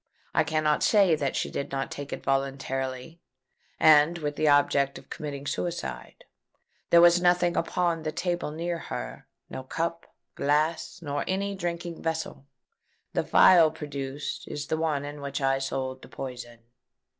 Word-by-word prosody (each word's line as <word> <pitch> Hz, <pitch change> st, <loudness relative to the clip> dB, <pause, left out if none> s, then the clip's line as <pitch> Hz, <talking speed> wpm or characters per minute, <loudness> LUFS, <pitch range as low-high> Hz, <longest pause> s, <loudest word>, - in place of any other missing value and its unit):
I -, -, +3 dB
cannot 155 Hz, -1 st, +1 dB
say 200 Hz, -5 st, +4 dB
that 145 Hz, -3 st, -1 dB
she -, -, -2 dB
did 140 Hz, -, -4 dB
not 135 Hz, 0 st, -3 dB
take 140 Hz, -1 st, -7 dB
it -, -, -5 dB
voluntarily, 135 Hz, +2 st, -2 dB, 0.6 s
and 155 Hz, +2 st, +6 dB
with 150 Hz, -3 st, -3 dB
the 155 Hz, -, +1 dB
object 140 Hz, -1 st, +3 dB
of -, -, -15 dB
committing 145 Hz, -2 st, -6 dB
suicide. 145 Hz, -, -4 dB, 0.6 s
There 170 Hz, -, +7 dB
was 175 Hz, 0 st, +6 dB
nothing 175 Hz, -1 st, +3 dB
upon 170 Hz, -2 st, 0 dB
the 155 Hz, 0 st, -3 dB
table 175 Hz, -1 st, -2 dB
near 170 Hz, +2 st, -3 dB
her—no 95 Hz, -, -8 dB
cup, 165 Hz, +5 st, -3 dB, 0.3 s
glass, 155 Hz, +4 st, 0 dB
nor 145 Hz, -1 st, -2 dB
any 200 Hz, +1 st, -1 dB
drinking 175 Hz, -2 st, -4 dB
vessel. 160 Hz, -4 st, -4 dB, 0.7 s
The -, -, +1 dB
phial 170 Hz, -4 st, +6 dB
produced 145 Hz, -2 st, -6 dB
is 145 Hz, 0 st, -5 dB
the 160 Hz, -, -1 dB
one 155 Hz, -3 st, -1 dB
in 145 Hz, 0 st, -7 dB
which 140 Hz, +1 st, -4 dB
I 135 Hz, -1 st, +1 dB
sold 130 Hz, -1 st, -3 dB
the -, -, -12 dB
poison." 120 Hz, -3 st, -8 dB
150 Hz, 150 wpm, -27 LUFS, 135-170 Hz, 0.7 s, There